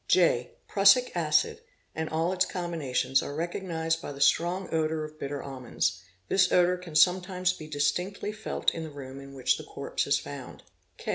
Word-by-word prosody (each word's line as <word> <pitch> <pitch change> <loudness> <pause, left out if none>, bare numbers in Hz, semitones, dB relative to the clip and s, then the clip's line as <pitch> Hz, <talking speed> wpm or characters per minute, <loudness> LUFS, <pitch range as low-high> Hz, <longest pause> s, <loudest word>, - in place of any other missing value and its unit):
(j) 145 -9 +3 0.2
Prussic 205 +5 +5
acid - - +2 0.3
and 160 0 -3
all 165 +3 0
its 185 -1 +3
combinations 160 -8 0
are 145 - -5
recognised 165 -1 -2
by - - -6
th 140 -1 0
strong 175 +5 +2
odour 160 -1 0
of 155 0 -9
bitter 140 0 -4
almonds; 125 -8 -2 0.3
this 185 - +3
odour 180 0 +4
can 175 -3 -10
sometimes 180 +2 +3
be 155 -4 -9
distinctly 155 +8 -1
felt 215 +1 -1
in 165 - -5
the 160 - -5
room 135 -2 -9
in 140 0 -11
which 130 -1 +1
the - - -7
corpse 140 - -3
is 140 0 +4
found. 140 -2 -8
160 Hz, 170 wpm, -28 LUFS, 140-180 Hz, 0.3 s, Prussic